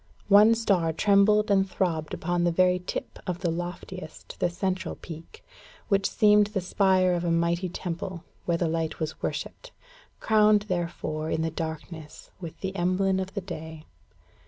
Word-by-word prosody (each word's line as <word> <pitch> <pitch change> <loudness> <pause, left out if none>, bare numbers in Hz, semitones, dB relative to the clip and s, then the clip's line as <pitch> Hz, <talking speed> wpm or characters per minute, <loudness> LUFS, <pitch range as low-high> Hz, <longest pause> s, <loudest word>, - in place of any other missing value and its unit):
One 210 +3 +7
star 195 -8 +1
trembled 210 +3 +4
and 195 -1 +3
throbbed 165 -5 -1
upon 175 +1 -1
the 175 - +3
very 180 +1 +3
tip 180 - -6
of 180 0 -3
the 175 -3 0
loftiest, 175 -1 -7
the 175 - +2
central 185 +1 -2
peak, 165 - -11 0.4
which 195 -1 +2
seemed 210 -1 +4
the 210 -1 -2
spire 185 0 +2
of 175 -1 -1
a 175 - 0
mighty 170 +2 +1
temple 175 0 -5 0.2
where 170 -1 +1
the 170 - 0
light 160 0 -2
was 155 -1 -4
worshipped - - -5 0.5
crowned, 215 -1 +4
therefore, 170 -4 -3
in 160 - 0
the 165 - -1
darkness, 160 -1 -7
with 170 -4 -9
the 190 0 -4
emblem 190 +1 +1
of 190 +1 -5
the 200 - -2
day. 160 -4 -8
180 Hz, 160 wpm, -27 LUFS, 165-195 Hz, 0.5 s, One